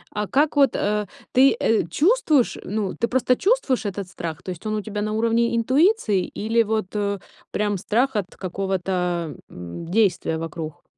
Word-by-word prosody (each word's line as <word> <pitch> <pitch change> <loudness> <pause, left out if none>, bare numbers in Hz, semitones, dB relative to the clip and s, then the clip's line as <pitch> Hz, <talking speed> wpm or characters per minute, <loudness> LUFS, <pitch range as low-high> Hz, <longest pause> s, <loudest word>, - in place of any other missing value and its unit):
А 210 -1 -1
как 290 +2 +2
вот, 280 -1 +4
э, 210 -1 0 0.2
ты, 265 0 +5
э, 225 - +2
чувствуешь, 305 - +2
ну 205 -2 -2
ты 235 - 0
просто 255 0 +2
чувствуешь 385 - +1
этот 200 -1 -4
страх, 165 -4 -6
то - - -7
есть 180 +1 -6
он 215 0 -1
у 210 - -1
тебя 210 0 -4
на 215 0 -2
уровне 230 +1 +2
интуиции 255 - +2
или 225 +2 0
вот, 215 -3 0
э, 200 -1 0 0.3
прям 205 -1 0
страх 245 +8 0
от 195 -3 -3
какого-то, 180 -4 -2
м, 90 - -8
действия 185 -4 +1
вокруг? 160 -1 -6
210 Hz, 170 wpm, -23 LUFS, 185-235 Hz, 0.3 s, ты